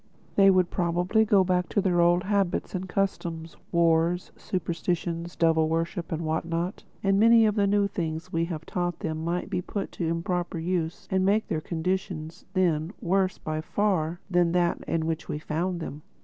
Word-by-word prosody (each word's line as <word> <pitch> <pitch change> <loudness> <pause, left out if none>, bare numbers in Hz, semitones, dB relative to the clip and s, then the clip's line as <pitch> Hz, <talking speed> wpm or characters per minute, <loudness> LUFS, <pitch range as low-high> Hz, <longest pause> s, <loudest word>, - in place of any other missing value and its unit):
They 195 -1 +7
would 185 -2 +3
probably 180 +5 +2
go 200 -3 +5
back 180 -1 0
to - - +1
their 180 -3 +2
old 175 +1 +4
habits 200 -3 0
and 185 0 -4
customs: 170 -4 -2 0.2
wars, 170 +1 +2
superstitions, 170 -1 -3
devil 160 -1 +3
worship 165 +2 -2
and 165 0 -2
what 160 +1 0
not; 170 +3 -3 0.2
and 195 0 +3
many 230 +1 +7
of 210 - +3
the 200 -1 +2
new 200 0 +3
things 170 -2 -4
we 165 0 +1
have 165 -2 -5
taught 175 -1 -2
them 155 0 -3
might 170 +2 -2
be 180 - 0
put 195 +2 -4
to 170 - -3
improper 170 +1 -2
use 165 0 -2
and 190 0 +2
make 205 +3 +2
their 155 - -1
condition, 170 -1 -2 0.2
then, 175 -2 +1
worse 185 +1 +1
by 155 0 -3
far 175 -3 0
than 175 -3 +2
that 175 -1 +1
in 165 -1 0
which 160 -1 -3
we - - -2
found 170 +4 -2
them.... 150 -2 -6
175 Hz, 180 wpm, -27 LUFS, 165-190 Hz, 0.2 s, They